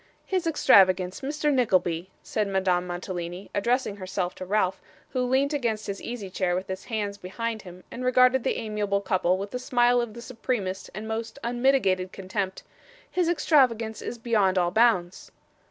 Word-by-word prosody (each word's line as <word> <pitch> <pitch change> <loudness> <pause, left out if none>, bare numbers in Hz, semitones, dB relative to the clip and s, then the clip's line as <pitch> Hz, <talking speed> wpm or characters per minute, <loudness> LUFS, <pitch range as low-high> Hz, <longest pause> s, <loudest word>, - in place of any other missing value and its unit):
'His 370 -3 -1
extravagance, 190 - +4
Mr. 295 +2 0
Nickleby,' 185 -8 +1
said 215 -2 -1
Madame 185 -2 +1
Mantalini, 175 +1 -5
addressing 235 +1 0
herself 185 -1 -3
to 185 - -7
Ralph, 195 -2 +1 0.3
who 255 - -1
leant 265 +4 +1
against 230 -6 -1
his 200 0 -5
easy 235 -4 -5
chair 185 -1 -1
with 185 +1 -3
his 190 0 -6
hands 205 -3 -3
behind 225 +4 -4
him, 180 -1 -12
and 250 - -6
regarded 255 0 +4
the - - 0
amiable 210 -3 -1
couple 185 -2 +1
with 200 +3 -6
a 250 - -2
smile 245 -1 +3
of 235 -2 -5
the 235 - -8
supremest 225 -6 -3
and 215 +2 -6
most 225 +1 -4
unmitigated 235 -7 +2
contempt, 190 0 -4 0.5
'his 355 -2 +1
extravagance 250 -10 +2
is 240 - -5
beyond 210 -5 +2
all 175 -1 +2
bounds. 195 -5 +2
210 Hz, 165 wpm, -26 LUFS, 185-245 Hz, 0.5 s, extravagance